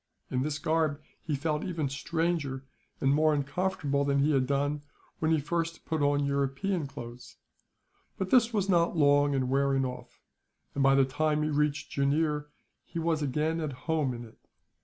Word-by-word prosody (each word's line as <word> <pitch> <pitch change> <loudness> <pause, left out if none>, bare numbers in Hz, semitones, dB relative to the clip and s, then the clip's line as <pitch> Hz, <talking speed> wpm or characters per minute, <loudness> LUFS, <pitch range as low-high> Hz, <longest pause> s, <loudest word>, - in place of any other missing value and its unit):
In 125 - 0
this 145 +1 -1
garb 155 -2 0 0.2
he 155 - -2
felt 150 +2 -1
even 165 -5 -2
stranger 150 -1 -2 0.3
and 135 +1 +3
more 155 +1 +3
uncomfortable 145 -1 -1
than 140 0 +1
he 140 +2 +3
had 130 -3 +2
done, 145 +1 0 0.4
when 160 - +1
he 160 -1 +3
first 165 +3 -3
put 160 -2 -1
on 145 0 +2
European 140 +5 -1
clothes; 120 -3 -10 0.8
but 190 -1 -3
this 240 -2 +5
was 205 -4 0
not 170 -2 +2
long 145 -1 +4
in 130 -1 0
wearing 135 0 +2
off 125 -1 -8 0.5
and, 140 - -1
by 135 0 +5
the 135 -1 +5
time 150 +3 0
he 155 - 0
reached 150 -1 0
Jooneer, 150 +1 +1 0.4
he - - -9
was 165 -1 0
again 150 +4 0
at 155 -4 -3
home 155 -5 +1
in 120 0 -7
it. 110 - -17
145 Hz, 175 wpm, -29 LUFS, 140-160 Hz, 0.8 s, this